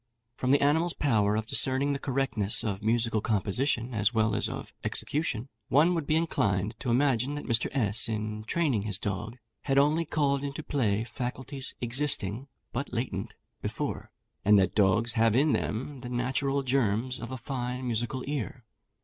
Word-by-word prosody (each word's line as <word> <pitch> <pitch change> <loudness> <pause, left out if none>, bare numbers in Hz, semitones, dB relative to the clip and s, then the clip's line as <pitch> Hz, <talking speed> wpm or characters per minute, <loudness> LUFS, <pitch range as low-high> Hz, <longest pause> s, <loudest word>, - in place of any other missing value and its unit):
From 130 - -2
the 140 +1 +4
animal's 160 +4 +2
power 105 -7 +2
of 110 0 -1
discerning 135 +5 +3
the 140 - -3
correctness 130 -7 +1
of 100 -3 -2
musical 110 0 +1
composition, 115 +4 0
as 105 -1 +2
well 110 -2 +2
as - - +2
of - - -7
execution, 140 -5 -1 0.2
one 160 +6 +4
would 165 -4 -2
be 155 - +2
inclined 105 - 0
to 130 - -3
imagine 130 +1 +2
that 145 - -6
Mr. 115 0 +1
S, 110 -4 +2
in 110 -1 -3
training 140 -5 +1
his 105 -2 -2
dog, 105 +4 -4 0.3
had 135 -1 +1
only 150 +4 +4
called 140 -3 0
into 140 +2 -4
play 110 -8 0
faculties 130 +3 -4
existing 125 -2 0 0.3
(but 135 +4 -3
latent) 120 +1 -3 0.3
before, - - -4 0.3
and 105 +1 +6
that 95 -2 +2
dogs 105 +3 +3
have 115 -1 +3
in 145 +3 +4
them 130 +5 -2
the 125 0 -7
natural 135 +3 0
germs 125 -1 0
of 115 - -6
a 130 - -5
fine 125 0 -4
musical 120 +2 -1
ear. 130 -4 -4
125 Hz, 165 wpm, -28 LUFS, 110-140 Hz, 0.3 s, and